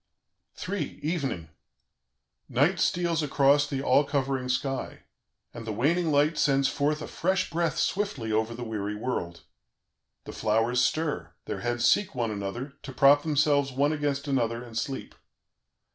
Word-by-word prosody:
"III. 200 +1 -3
EVENING 140 - -2 1.0
"Night 155 +9 +2
steals 170 -2 +1
across 145 0 +3
the 135 -2 -3
all 140 +2 +4
covering 135 -3 -1
sky, 135 +1 -2 0.5
and 115 -1 -8
the - - -1
waning 160 - +1
light 150 +2 +2
sends 135 -1 +3
forth 150 +2 0
a - - -6
fresh 190 +3 -1
breath 170 0 0
swiftly 185 - -1
over 110 +2 0
the 120 - -6
weary 105 -2 -3
world. 105 -7 -4 0.8
The - - -9
flowers 115 +3 +1
stir, 140 - -1
their - - -4
heads 120 0 0
seek 205 -7 +2
one 115 -3 -1
another, 105 +7 -5
to 135 - -8
prop 140 +2 +5
themselves 145 -2 +2
one 140 +4 +1
against 145 -1 -2
another 120 -3 0
and 115 -2 -12
sleep. 130 +4 -4
135 Hz, 145 wpm, -27 LUFS, 115-150 Hz, 1.0 s, prop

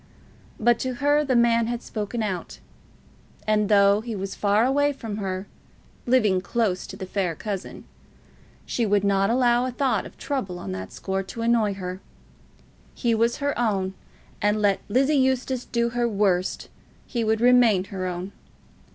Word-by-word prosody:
But 235 +1 +3
to 255 -1 -2
her 290 +2 +2
the 265 -3 0
man 235 -1 +3
had 240 0 -3
spoken 220 +1 -3
out; 190 -4 -4 0.9
and 210 -1 +2
though 200 0 +5
he 230 -1 -5
was 195 0 -4
far 205 +2 +2
away 285 +2 +2
from 225 -6 -6
her, 190 -2 -3 0.6
living 215 -7 +3
close 200 -4 -1
to - - -8
the 190 - -5
fair 185 -3 -2
cousin, 200 +2 -6 0.8
she 240 - -1
would 205 -2 +2
not 195 0 +2
allow 245 0 +3
a - - -3
thought 245 -5 0
of - - -17
trouble 260 -11 -3
on 95 - -6
that 95 0 -6
score 190 0 -3
to 195 +4 -6
annoy 230 -4 +2
her. 185 0 -6 0.9
He 235 -2 +1
was 230 +1 +1
her 285 -1 -1
own, 195 -5 0 0.5
and 210 +1 +2
let 205 -2 +2
Lizzie 265 +7 +3
Eustace 260 -1 0
do 235 0 0
her 240 0 0
worst, 195 -4 0 0.4
he 235 -2 -2
would 220 0 +1
remain 240 -5 +5
her 190 -1 -5
own. 180 +2 -5
215 Hz, 165 wpm, -24 LUFS, 195-240 Hz, 0.9 s, though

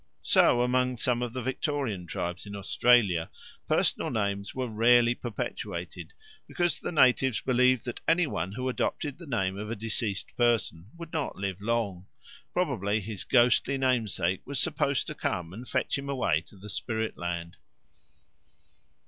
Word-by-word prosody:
So 120 0 +4
among 125 0 +1
some 120 +1 +1
of 120 -1 -2
the 130 0 -4
Victorian 130 - -2
tribes 90 +4 -4
in 100 - -7
Australia 100 -4 +3 0.4
personal - - +2
names 100 -2 -2
were 130 -1 -2
rarely 120 +2 +4
perpetuated, 120 -2 -5 0.4
because 175 -2 0
the - - -4
natives 130 -4 +4
believed 125 -1 +3
that 120 - -5
any 170 +1 +4
one 95 - -3
who 125 +3 -3
adopted 140 +3 -2
the 170 - -10
name 95 -6 -1
of 105 0 -5
a 115 - -2
deceased 110 -2 -2
person 110 -7 +1
would 170 -1 -9
not 155 -3 -2
live 95 -1 -4
long; 105 -5 -1 0.4
probably 100 +3 0
his 105 -1 -5
ghostly 125 +2 +3
namesake 110 -9 0
was 140 -1 -3
supposed 140 +1 +1
to - - -5
come 90 -1 -3
and 120 +5 -9
fetch 130 +1 0
him 140 0 -6
away 95 - +1
to - - -16
the 100 +3 -11
spirit 110 +3 -2
land. 85 -1 -4
115 Hz, 155 wpm, -28 LUFS, 100-130 Hz, 0.4 s, So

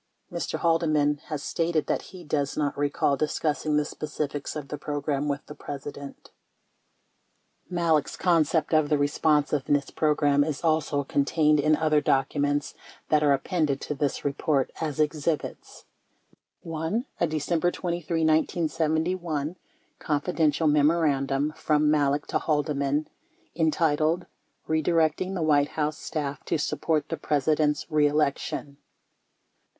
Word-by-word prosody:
24 - - -3
Mr. - - -12
Haldeman 155 -3 +2
has 150 -2 -5
stated 165 -2 0
that - - -1
he 185 -1 -12
does 145 -2 -2
not 145 -2 0
recall 145 0 +1
discussing 150 +1 0
the 150 - +1
specifics 150 -1 -4
of 150 -2 -6
the 150 - -4
program 145 -1 -2
with 140 +1 -2
the - - -9
President. 140 -1 -8 1.4
25 - - -29
Malek's 165 -5 +1
concept 165 -2 +2
of 155 -2 +3
the 150 - +3
Responsiveness 145 -1 +1
Program 145 -2 +2
is 150 0 -4
also 155 -3 +1
contained 150 +2 +2
in 155 +2 +4
other 155 -1 +2
documents 145 +2 0 0.4
that 150 -1 +4
are 145 -1 +4
appended 140 0 0
to - - -3
this 145 -1 -2
report 140 -1 0
as 155 -2 -3
exhibits: 155 0 -2 0.8
1. 165 - -2
A 170 - +2
December 160 +3 0
23, 170 -2 -2
1971, 160 0 0 0.4
"Confidential" 155 0 0
memorandum 150 -2 +2
from 150 -1 +2
Malek 145 -1 +2
to - - -1
Haldeman 150 -1 0 0.5
entitled 160 +1 +1 0.4
"Redirecting 160 +3 +1
the 170 - -1
White 145 -2 +3
House 150 0 -1
Staff 145 -2 -4
to - - 0
Support 155 +1 -1
the 165 - -2
President's 150 +1 +1
Re 150 -1 +4
Election." 145 -1 -1
150 Hz, 125 wpm, -26 LUFS, 145-160 Hz, 1.4 s, in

